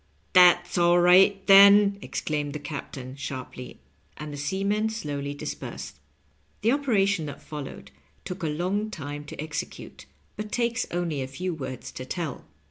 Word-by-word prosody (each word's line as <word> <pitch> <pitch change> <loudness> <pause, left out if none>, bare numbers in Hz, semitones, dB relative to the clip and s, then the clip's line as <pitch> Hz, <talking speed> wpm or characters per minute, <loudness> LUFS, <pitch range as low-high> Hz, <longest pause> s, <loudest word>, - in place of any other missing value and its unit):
" - - -40
That's 175 -1 +6
all 175 0 +5
right, 190 +3 +5
then," 200 0 +7
exclaimed 145 -6 -3
the - - -3
captain, 140 -3 -7
sharp 130 -2 -6
ly; 125 0 -9 0.4
and 150 -1 -7
the - - -6
seamen 200 +8 0
slowly 145 -9 -4
dispersed. 70 - -7 0.6
The 225 - +3
operation 205 - +1
that 145 - -7
followed 135 - -8 0.3
took 185 +1 -6
a 165 - -1
long 185 +8 -1
time 145 -5 -7
to - - -10
exe 155 0 -3
cute, - - -12 0.3
but 210 0 -6
takes 235 -1 0
only 170 -5 -2
a 130 - -3
few 175 +7 -4
words 130 -5 -7
to 130 - -7
tell. 155 0 -5
170 Hz, 160 wpm, -26 LUFS, 145-200 Hz, 0.6 s, then